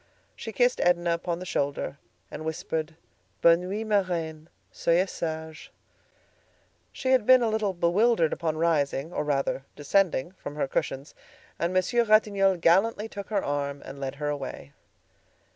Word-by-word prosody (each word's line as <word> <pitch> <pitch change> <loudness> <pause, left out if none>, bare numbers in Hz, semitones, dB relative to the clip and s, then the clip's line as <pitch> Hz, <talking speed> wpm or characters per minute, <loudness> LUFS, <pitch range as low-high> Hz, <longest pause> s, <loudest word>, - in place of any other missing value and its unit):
She 225 - -7
kissed 245 +2 +2
Edna 175 -1 +2
upon 170 0 -2
the 185 - -7
shoulder, 140 -4 -2 0.3
and 155 - -6
whispered: 160 0 -3 0.5
"Bonne 170 +2 +5
nuit, 210 +3 -3
ma 210 -2 +3
reine; 165 -4 -4 0.2
soyez 180 +3 +1
sage." 160 -1 -5 1.2
She 260 - -2
had 260 -4 +4
been 255 -1 +7
a 230 - +2
little 215 -3 0
bewildered 175 +1 +2
upon 160 -2 -2
rising, 155 -1 0
or - - -1
rather, 140 -2 -1
descending 170 0 +1
from 150 -6 -9
her 150 - -1
cushions, 135 +1 -3 0.5
and 170 +1 0
Monsieur 185 +6 +2
Ratignolle 205 -3 +3
gallantly 195 +6 +3
took 200 -2 -8
her 205 -3 -1
arm 140 0 -2
and 140 - -9
led 135 0 -4
her 150 +1 -3
away. 135 - -6
170 Hz, 150 wpm, -27 LUFS, 150-200 Hz, 1.2 s, been